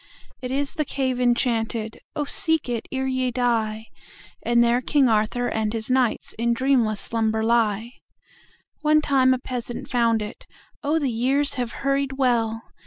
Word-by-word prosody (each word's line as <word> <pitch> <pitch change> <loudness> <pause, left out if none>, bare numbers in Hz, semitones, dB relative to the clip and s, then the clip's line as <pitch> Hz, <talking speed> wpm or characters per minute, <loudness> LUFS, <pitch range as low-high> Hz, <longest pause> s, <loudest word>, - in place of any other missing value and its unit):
It 250 - -4
is 275 +2 -1
the 315 -4 -1
cave 260 -3 -2
enchanted(Oh, 235 +2 -1
seek 320 0 +1
it 235 -2 -3
ere 265 0 -2
ye 260 -1 0
die!)And 235 0 -2
there 235 +1 +2
King 275 +1 +3
Arthur 225 +2 +1
and 220 -1 -1
his 225 0 -3
knightsIn 235 -2 0
dreamless 240 -5 +1
slumber 220 0 0
lie. 230 0 0 0.8
One 305 0 +3
time 265 -3 +3
a 255 - +3
peasant 245 -1 -5
found 230 -3 +2
it(Oh, 285 +7 -5
the 280 -5 0
years 270 +5 +1
have 245 -3 -3
hurried 275 0 +1
well!) 230 -4 0
245 Hz, 140 wpm, -23 LUFS, 225-265 Hz, 0.8 s, King